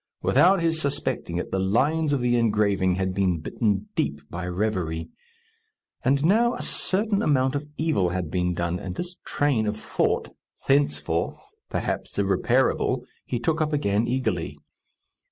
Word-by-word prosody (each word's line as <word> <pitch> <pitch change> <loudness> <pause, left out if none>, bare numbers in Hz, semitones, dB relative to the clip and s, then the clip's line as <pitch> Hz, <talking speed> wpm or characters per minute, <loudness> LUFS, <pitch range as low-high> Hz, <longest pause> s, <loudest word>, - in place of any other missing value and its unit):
Without 185 -1 +4
his 165 -1 +2
suspecting 140 - -1
it, 90 - -4
the 95 - 0
lines 145 +11 +2
of 140 -3 +1
the 120 0 +2
engraving 105 -5 +2
had 95 0 -1
been 95 -3 +1
bitten 105 +4 -1
deep 75 - -1
by 90 +1 -4
reverie. 90 -4 -2 0.9
And 140 +3 +2
now 230 +7 +4
a - - -5
certain 205 +1 0
amount 130 -3 +2
of 145 +1 -3
evil 155 - +1
had 90 -3 -3
been 90 -1 0
done, 85 +1 -1
and 90 -1 -6
this 180 0 -5
train 135 -7 +1
of 105 0 -1
thought, - - -1 0.3
thenceforth, 135 - +1 0.3
perhaps, - - -3
irreparable, 120 +5 +1 0.2
he 125 - -1
took 160 +7 0
up 155 0 0
again 110 -6 +1
eagerly. 120 -10 -1
115 Hz, 150 wpm, -25 LUFS, 95-145 Hz, 0.9 s, Without